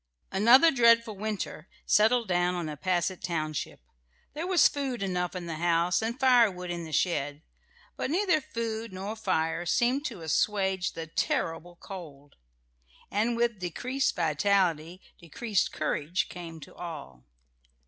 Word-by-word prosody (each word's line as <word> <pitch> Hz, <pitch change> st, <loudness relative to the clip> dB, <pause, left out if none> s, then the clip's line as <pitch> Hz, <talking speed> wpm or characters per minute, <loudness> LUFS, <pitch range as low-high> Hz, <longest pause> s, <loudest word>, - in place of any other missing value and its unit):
Another 240 Hz, -, +6 dB
dreadful 230 Hz, -4 st, +4 dB
winter 200 Hz, -5 st, -4 dB, 0.2 s
settled 225 Hz, +2 st, +3 dB
down 180 Hz, 0 st, +1 dB
on 175 Hz, -2 st, -3 dB
Nepasset 175 Hz, +4 st, -1 dB
township. 155 Hz, -, -3 dB, 0.5 s
There 320 Hz, +4 st, -4 dB
was 365 Hz, -4 st, +6 dB
food 265 Hz, -6 st, -3 dB
enough 180 Hz, -1 st, -2 dB
in 180 Hz, -1 st, -5 dB
the 165 Hz, -2 st, -5 dB
house 170 Hz, +2 st, +2 dB
and 230 Hz, +4 st, -3 dB
firewood 230 Hz, -9 st, +3 dB
in 170 Hz, -1 st, -4 dB
the 160 Hz, -, -9 dB
shed; 145 Hz, -3 st, -1 dB, 0.5 s
but -, -, -2 dB
neither 350 Hz, -1 st, +2 dB
food 230 Hz, -3 st, -4 dB
nor 195 Hz, +3 st, -5 dB
fire 175 Hz, -6 st, -1 dB
seemed 245 Hz, +10 st, +1 dB
to 225 Hz, -, -5 dB
assuage 190 Hz, +3 st, 0 dB
the 165 Hz, -, -5 dB
terrible 165 Hz, +1 st, -2 dB
cold, 150 Hz, -7 st, -11 dB, 0.8 s
and 225 Hz, +3 st, 0 dB
with 235 Hz, -3 st, 0 dB
decreased 255 Hz, -, -1 dB
vitality 170 Hz, +1 st, +1 dB, 0.2 s
decreased 195 Hz, +5 st, -1 dB
courage 155 Hz, +3 st, -1 dB
came 170 Hz, -2 st, -8 dB
to -, -, -12 dB
all. 145 Hz, -, -8 dB
185 Hz, 135 wpm, -28 LUFS, 165-230 Hz, 0.8 s, Another